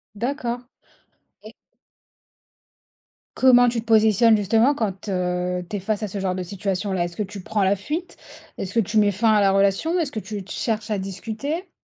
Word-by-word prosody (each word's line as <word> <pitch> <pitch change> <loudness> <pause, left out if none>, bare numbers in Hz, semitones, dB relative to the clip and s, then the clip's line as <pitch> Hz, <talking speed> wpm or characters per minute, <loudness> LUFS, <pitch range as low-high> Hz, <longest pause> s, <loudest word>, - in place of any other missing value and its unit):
D'accord, 245 +1 -2 0.8
et - - -11 1.8
Comment 245 -1 +6
tu 235 -1 -2
te 225 - -8
positionnes 220 0 +5
justement 225 +7 +3
quand, 205 -5 -3
heu, 180 -1 -1
tu 210 - -3
es - - -4
face 210 +2 -2
à - - -1
ce 200 +1 -5
genre 185 -1 -1
de 185 - -3
situation-là? 190 -1 -2
Est-ce 175 - -8
que 210 - -1
tu 200 0 -8
prends 205 +2 -1
la 190 +1 +3
fuite? 305 - -5 0.4
Est-ce 195 0 -5
que 230 - +2
tu 215 +1 0
mets 205 -1 +4
fin 220 +3 +2
à 210 - +4
la 195 -1 +4
relation? 200 - +2
Est-ce 295 -4 -1
que 220 - -4
tu 210 -2 -6
te 200 - -12
cherches 220 -1 -2
à 210 - +1
discuter? 225 - -5
210 Hz, 195 wpm, -23 LUFS, 195-230 Hz, 1.8 s, Comment